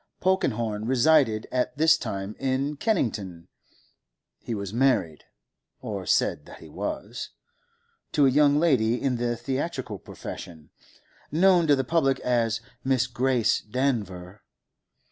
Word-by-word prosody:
Polkenhorne 115 - 0
resided 130 -4 +3
at 125 0 -1
this 160 +1 +5
time 105 -7 -5
in 135 +2 -1
Kennington; 105 - -2 0.9
he 115 - -5
was 100 -1 -5
married—or 85 - -3
said 75 - +1
that - - -11
he - - -13
was—to 465 - -5
a - - +5
young 145 +1 +4
lady 125 -8 +2
in 130 -3 0
the 120 0 -1
theatrical 130 - -4
profession, 80 -3 -9 0.6
known 175 +1 +4
to 145 - +5
the 135 - -1
public 135 -1 +1
as 115 -2 0 0.2
Miss 130 -1 +2
Grace 125 -1 +1
Danver. 105 -7 -3
125 Hz, 115 wpm, -26 LUFS, 110-145 Hz, 0.9 s, this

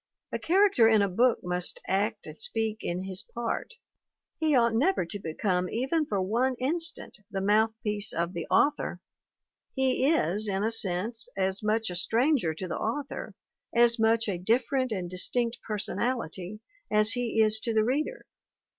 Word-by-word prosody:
A - - -3
character 380 - +4
in 220 -2 +4
a - - +2
book 235 +6 +2
must 180 0 -3
act 200 +3 -1
and - - -8
speak 225 - -1
in 175 +2 -3
his 190 0 +1
part; 240 - -5 0.6
he 310 -2 +2
ought 235 -2 +3
never 285 - +2
to 205 +4 -6
become 180 +1 -1
even 275 +6 -1
for 200 - -1
one 235 +7 0
instant 330 +2 -1
the 195 - -3
mouthpiece 210 +1 +1
of 170 +2 -2
the 170 -3 -5
author; 295 0 +1 0.8
he 265 +1 +2
is, 210 - +1
in 195 0 -1
a 220 - 0
sense, 225 +3 +1
as 190 0 +1
much 220 -1 0
a - - -5
stranger 225 - +2
to 185 +3 -5
the 170 - -4
author, 275 +5 -4 0.4
as 235 0 +5
much 225 0 +2
a 185 -4 -2
different 250 +6 0
and 185 -4 -3
dis 180 0 +1
tinct 240 -1 -1
personality, 215 -3 -3 0.3
as 215 +1 +3
he 245 -2 -1
is 220 0 +4
to 230 - -2
the 220 -1 +2
reader. 300 - -2
220 Hz, 165 wpm, -28 LUFS, 195-250 Hz, 0.8 s, as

